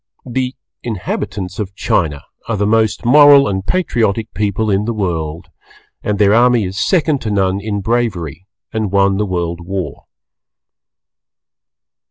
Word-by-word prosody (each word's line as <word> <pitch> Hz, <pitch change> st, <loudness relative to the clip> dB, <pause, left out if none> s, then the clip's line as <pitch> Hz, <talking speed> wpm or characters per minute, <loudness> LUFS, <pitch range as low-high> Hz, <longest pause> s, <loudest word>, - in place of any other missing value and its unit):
The 130 Hz, +1 st, -2 dB, 0.3 s
inhabitants 100 Hz, -3 st, -4 dB
of 100 Hz, -2 st, -4 dB
China 75 Hz, -7 st, 0 dB, 0.2 s
are 115 Hz, -, -1 dB
the 100 Hz, -, +1 dB
most 110 Hz, +1 st, +1 dB
Moral 145 Hz, +2 st, +7 dB
and 95 Hz, -1 st, -2 dB
Patriotic 115 Hz, -, -1 dB
people 105 Hz, +1 st, -1 dB
in 100 Hz, +2 st, +1 dB
the 115 Hz, 0 st, -2 dB
World, 80 Hz, -5 st, -3 dB, 0.5 s
and 105 Hz, -1 st, -1 dB
their 100 Hz, 0 st, +4 dB
army 120 Hz, -1 st, +4 dB
is 95 Hz, +2 st, -4 dB
second 155 Hz, -6 st, +1 dB
to 110 Hz, -, -3 dB
none 95 Hz, -2 st, +1 dB
in 105 Hz, -1 st, -3 dB
bravery 95 Hz, -, -2 dB, 0.3 s
and 110 Hz, -3 st, -1 dB
won 100 Hz, -1 st, +3 dB
the 105 Hz, 0 st, -1 dB
World 85 Hz, -2 st, -2 dB
War. 95 Hz, +1 st, -5 dB
105 Hz, 140 wpm, -16 LUFS, 95-115 Hz, 0.5 s, Moral